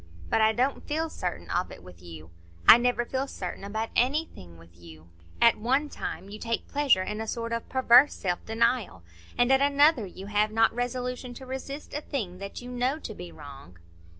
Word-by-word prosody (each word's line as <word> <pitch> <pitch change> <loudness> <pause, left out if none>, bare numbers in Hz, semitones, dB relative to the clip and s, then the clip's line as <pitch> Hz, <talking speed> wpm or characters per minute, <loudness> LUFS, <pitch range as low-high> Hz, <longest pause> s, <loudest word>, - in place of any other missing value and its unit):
But - - +3
I 220 0 +5
don't 255 +5 -1
feel 320 +2 -2
certain 180 -1 -5
of 180 +1 -1
it - - -12
with 90 -1 -14
you; 80 -2 -11 0.4
I 230 - +10
never 245 0 +1
feel 265 +2 -2
certain 185 -6 -6
about 220 +3 -3
anything 250 - -1
with 85 +1 -18
you. 85 -1 -15 0.3
At 235 -2 +5
one 265 +7 +1
time 190 - -6
you 210 +2 -9
take 230 0 -3
pleasure 280 -10 +2
in 210 +3 -4
a 220 - -5
sort 230 0 -3
of 230 - -4
perverse 260 +2 +5
self 180 -2 -3
denial, 225 - 0 0.3
and 245 +2 +3
at 270 0 +5
another 285 -4 +4
you 190 +1 -10
have 210 +1 +1
not 225 +1 +3
resolution 245 +1 -4
to 260 - -10
resist 265 +3 -7
a 295 - -3
thing 200 - -5
that 200 +4 -7
you 250 - -8
know 250 +4 0
to 230 - -7
be 175 -3 -9
wrong." 135 - -12
230 Hz, 200 wpm, -27 LUFS, 185-260 Hz, 0.4 s, I